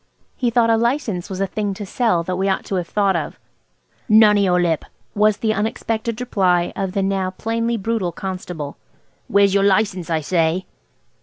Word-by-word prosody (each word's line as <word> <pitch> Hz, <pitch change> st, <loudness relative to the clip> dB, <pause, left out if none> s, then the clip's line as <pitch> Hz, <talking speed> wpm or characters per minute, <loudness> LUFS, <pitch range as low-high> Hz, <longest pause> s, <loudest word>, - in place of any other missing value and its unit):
He 245 Hz, -, 0 dB
thought 230 Hz, -1 st, +3 dB
a 225 Hz, -, +4 dB
license 230 Hz, -6 st, -1 dB
was 190 Hz, -1 st, -5 dB
a 195 Hz, -, +1 dB
thing 205 Hz, 0 st, -3 dB
to 205 Hz, +1 st, -6 dB
sell 195 Hz, -4 st, +1 dB
that 185 Hz, +2 st, -3 dB
we 190 Hz, +2 st, 0 dB
ought 190 Hz, -, -1 dB
to -, -, -5 dB
have 175 Hz, -2 st, -3 dB
thought 200 Hz, 0 st, +1 dB
of. -, -, -3 dB, 0.7 s
"None 215 Hz, -1 st, +7 dB
of -, -, +3 dB
your 180 Hz, -2 st, +3 dB
lip," 170 Hz, -3 st, +1 dB, 0.3 s
was 210 Hz, 0 st, +3 dB
the 220 Hz, -1 st, 0 dB
unexpected 220 Hz, +1 st, -2 dB
reply 185 Hz, -8 st, +1 dB
of 190 Hz, -2 st, -3 dB
the 200 Hz, -2 st, 0 dB
now 190 Hz, -1 st, 0 dB
plainly 230 Hz, +4 st, -2 dB
brutal 215 Hz, -3 st, -1 dB
constable. 180 Hz, -5 st, -6 dB, 0.5 s
"Where's 200 Hz, 0 st, +3 dB
your 200 Hz, -, +3 dB
license, 195 Hz, -3 st, +1 dB
I 160 Hz, -2 st, 0 dB
say?" 165 Hz, +3 st, 0 dB
195 Hz, 185 wpm, -20 LUFS, 185-220 Hz, 0.7 s, None